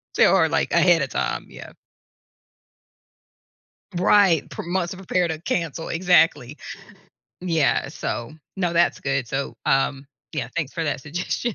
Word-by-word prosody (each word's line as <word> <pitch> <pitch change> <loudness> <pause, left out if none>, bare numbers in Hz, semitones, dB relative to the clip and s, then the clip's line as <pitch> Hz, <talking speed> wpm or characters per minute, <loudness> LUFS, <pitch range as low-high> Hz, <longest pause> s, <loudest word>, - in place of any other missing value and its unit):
tell - - +5
her - - +4 0.3
ahead 175 -3 +5
of 135 - -4
time, 65 -2 -2
yeah. - - -11 2.2
Right. 185 -3 +4
pro - - -7
months 175 0 -1
are - - -11
prepared 180 -2 -1
to 160 0 -4
cancel. 165 -2 -3
Exactly. 165 -6 +2 0.8
Yeah. 165 -5 +1
So 120 +5 -5 0.2
no, 180 -3 0
that's 170 0 +2
good. 135 -2 -1
So, 135 +1 -3
um, 135 0 +1 0.3
yeah, 135 -7 -3
thanks 155 -5 -2
for 165 -1 -3
that 145 -3 -2
suggestion. 180 - -3
165 Hz, 135 wpm, -23 LUFS, 140-180 Hz, 2.2 s, tell